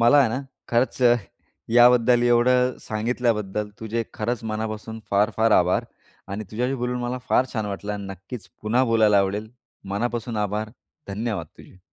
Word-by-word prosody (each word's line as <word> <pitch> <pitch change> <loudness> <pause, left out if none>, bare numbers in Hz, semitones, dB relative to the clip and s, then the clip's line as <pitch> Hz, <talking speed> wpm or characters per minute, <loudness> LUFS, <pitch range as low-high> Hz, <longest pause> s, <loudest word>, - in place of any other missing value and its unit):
मला 120 +5 +6
आहे 135 -5 +5
ना, 130 +4 -2 0.3
खरंच 125 +2 +1
अ, 120 -1 +7 0.6
याबद्दल 120 0 +6
एवढं 125 +1 +3
सांगितल्याबद्दल, 110 -2 -1
तुझे 115 +1 -2
खरंच 115 +1 -2
मनापासून 110 +1 -4
फार, 100 +1 +3
फार 115 0 +3
आभार 90 +1 +3 0.4
आणि 105 +2 -4
तुझ्याशी 125 +5 -1
बोलून 125 0 -2
मला 125 +1 -2
फार 130 - +4
छान 110 -3 -2
वाटलं 100 +1 -4
आणि 100 -1 -5
नक्कीच 100 +5 -9
पुन्हा 120 +5 +2
बोलायला 110 -3 +4
आवडेल. 100 +3 -1 0.4
मनापासून 115 +3 -2
आभार. 105 +1 -2 0.4
धन्यवाद, 100 -4 -3
तुझे. 95 - -15
110 Hz, 150 wpm, -24 LUFS, 105-120 Hz, 0.6 s, अ